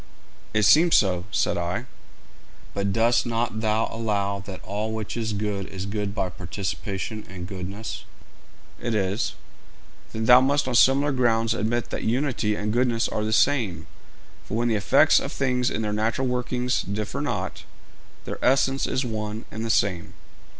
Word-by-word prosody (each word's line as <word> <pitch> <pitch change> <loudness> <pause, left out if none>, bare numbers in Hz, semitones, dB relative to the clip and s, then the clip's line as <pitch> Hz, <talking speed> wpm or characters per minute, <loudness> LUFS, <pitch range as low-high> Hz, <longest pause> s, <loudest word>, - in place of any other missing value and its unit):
'It 110 0 +2
seems 165 - +6
so,' 90 -3 +2
said - - 0
I. - - -2 0.9
'But 100 0 -1
dost 115 +3 +2
not 115 -1 -1
thou 110 0 +1
allow 100 -3 -1
that 95 -2 -6
all 105 +3 -3
which 110 -2 -4
is 115 -2 -2
good 100 -2 -2
is 95 0 -6
good 100 0 -3
by 95 -3 -1
participation 95 +4 -4
in 90 -1 -7
goodness?' 95 +3 -6 0.8
'It 120 -2 -1
is.' 100 +1 -1 0.8
'Then, 110 0 -3
thou 125 +2 +8
must 140 +1 +2
on 130 - -1
similar 135 +4 +5
grounds 115 -3 +2
admit 115 +1 -1
that - - -3
unity 120 -3 0
and 105 +1 -2
goodness 120 -1 +2
are 105 - -2
the 110 - -1
same; 110 -5 +2 0.6
for 110 - -4
when 120 +1 +1
the 110 - +2
effects 100 - +5
of - - -5
things 125 -2 0
in 110 - -2
their 105 -1 -1
natural 115 +5 0
working 125 0 -2 0.2
differ 105 0 -3
not, - - -3 0.6
their - - -6
essence 135 +1 +3
is 130 - -1
one 110 -1 -4
and 110 +1 -5
the 115 - -3
same.' 95 -6 0
110 Hz, 165 wpm, -25 LUFS, 100-120 Hz, 0.9 s, thou